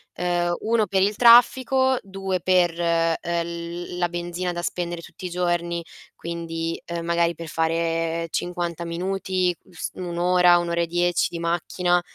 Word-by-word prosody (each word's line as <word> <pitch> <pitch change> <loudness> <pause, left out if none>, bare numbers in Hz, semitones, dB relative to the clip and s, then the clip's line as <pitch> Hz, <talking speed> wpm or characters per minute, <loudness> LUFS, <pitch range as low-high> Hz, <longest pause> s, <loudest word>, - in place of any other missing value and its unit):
Ehm, 175 -1 0
1 220 -1 +1
per 190 -1 +1
il 205 +2 +2
traffico, 260 +2 +5
2 195 -2 -3
per, 175 -2 +2
ehm, 165 -1 +2
l 170 +1 -4
la 175 -1 +1
benzina 175 +1 -3
da 175 - -4
spendere 175 -1 -3
tutti 185 - -8
i - - -6
giorni, 175 -1 -1 0.3
quindi, 165 -1 -4
ehm, 170 -1 -5
magari 170 0 +1
per 165 0 -8
fare 165 +1 -1
50 175 -1 -3
minuti, 185 +1 -1 0.2
s 175 - -5
1 175 -2 -5
ora, 180 0 +5
1 175 0 -1
ora 170 0 +1
e 170 - 0
10 175 0 +1
di 170 - -6
macchina, 175 +1 0
175 Hz, 160 wpm, -24 LUFS, 170-180 Hz, 0.3 s, traffico